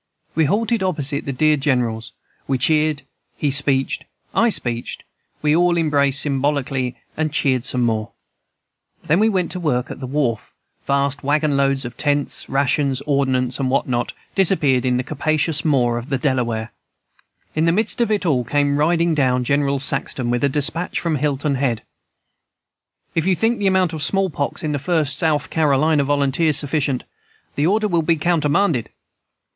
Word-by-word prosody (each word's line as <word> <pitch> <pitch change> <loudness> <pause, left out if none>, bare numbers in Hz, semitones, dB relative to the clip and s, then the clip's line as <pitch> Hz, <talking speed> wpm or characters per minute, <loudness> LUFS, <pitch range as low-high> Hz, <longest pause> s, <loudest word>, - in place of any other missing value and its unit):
We 160 0 +2
halted 220 - 0
opposite 150 -6 -2
the - - -1
dear 155 +3 +2
General's; 120 -4 -1 0.4
we 135 - +1
cheered, 155 +2 +1 0.3
he 145 - 0
speeched, 135 -1 +1 0.3
I 235 - +3
speeched, 120 - -3 0.4
we 150 0 +3
all 175 0 +3
embraced 145 -4 +2
symbolically, 135 -3 -1 0.2
and 155 -1 -1
cheered 130 -4 +1
some 125 -2 +1
more. 110 -1 0 1.0
Then 165 +5 +2
we 220 +1 +4
went 185 -4 -1
to 185 - -4
work 135 -6 -1
at - - -8
the 130 - -5
wharf; 125 -5 -2 0.3
vast 140 0 0
wagon 145 +1 +1
loads 135 -1 +1
of 120 0 -8
tents, 145 -3 0
rations, 135 0 +1
ordnance, 130 -3 0
and 130 -2 0
what 135 +2 +1
not 120 -1 -2 0.2
disappeared 150 -10 +2
in 125 -1 +2
the 125 - -1
capacious 155 +3 0
maw 125 -6 +2
of 120 +3 -6
the 135 - 0
Delaware. 120 -4 -1 0.8
In 155 +1 +1
the 165 - +4
midst 220 +6 0
of 235 - +2
it 210 -3 0
all 135 -7 +2
came 145 +3 +1
riding 165 +2 +2
down 130 -4 +1
General 140 +2 +1
Saxton 135 -2 -2
with 120 +2 -1
a 140 - +3
despatch 150 +5 -1
from 165 -3 -1
Hilton 145 0 -1
Head: 120 -5 0 1.3
"'If 165 +2 0
you 190 - +3
think 225 +5 0
the 200 - +1
amount 185 -3 +2
of 155 - -4
small 195 +4 +1
pox 145 +2 -3
in 155 - -1
the 145 - -1
First 155 -3 +1
South 155 -4 0
Carolina 150 -1 +2
Volunteers 145 +2 +1
sufficient, 145 -3 0 0.5
the 145 +2 +1
order 210 +3 +2
will 170 -4 +1
be 165 +1 +2
countermanded.' 155 - +1
145 Hz, 170 wpm, -20 LUFS, 130-160 Hz, 1.3 s, we